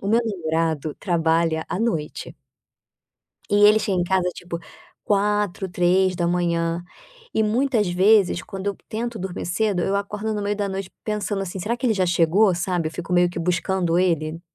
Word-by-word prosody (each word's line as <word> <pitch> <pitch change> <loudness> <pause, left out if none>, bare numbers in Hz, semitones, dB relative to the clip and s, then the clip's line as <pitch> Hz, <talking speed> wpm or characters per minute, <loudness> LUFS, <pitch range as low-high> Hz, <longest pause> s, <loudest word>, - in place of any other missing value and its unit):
o 195 - -4
meu 225 +2 +4
namorado 160 -6 -1
trabalha 165 -2 +1
à - - -2
noite 170 -10 -2 1.2
e 205 0 +5
ele 210 +1 +7
chega 195 -3 -1
em 175 - +1
casa, 185 0 +1
tipo, 170 -1 -6 0.5
04:00, 205 -2 0
03:00. 175 -2 +1 0.5
E, 220 - +3
muitas 225 -2 +1
vezes, 190 0 +3
quando 195 0 -7
eu 200 - -3
tento 235 +1 -4
dormir 185 -1 -5
cedo, 190 +1 0
eu 195 +2 0
acordo 210 +2 -3
no 205 - -2
meio 205 0 -1
da 205 -1 -1
noite 190 -1 -5
pensando 210 -2 -2
assim: 190 0 -5
"Será 230 +6 -1
que 255 - -2
ele 225 - +3
já 185 -2 +1
chegou?", 175 +3 +3
sabe, 175 -2 -1
fico 175 +1 -6
meio 175 0 +4
que 175 - -6
buscando 175 0 0
ele. 165 -3 0
185 Hz, 170 wpm, -23 LUFS, 170-205 Hz, 1.2 s, ele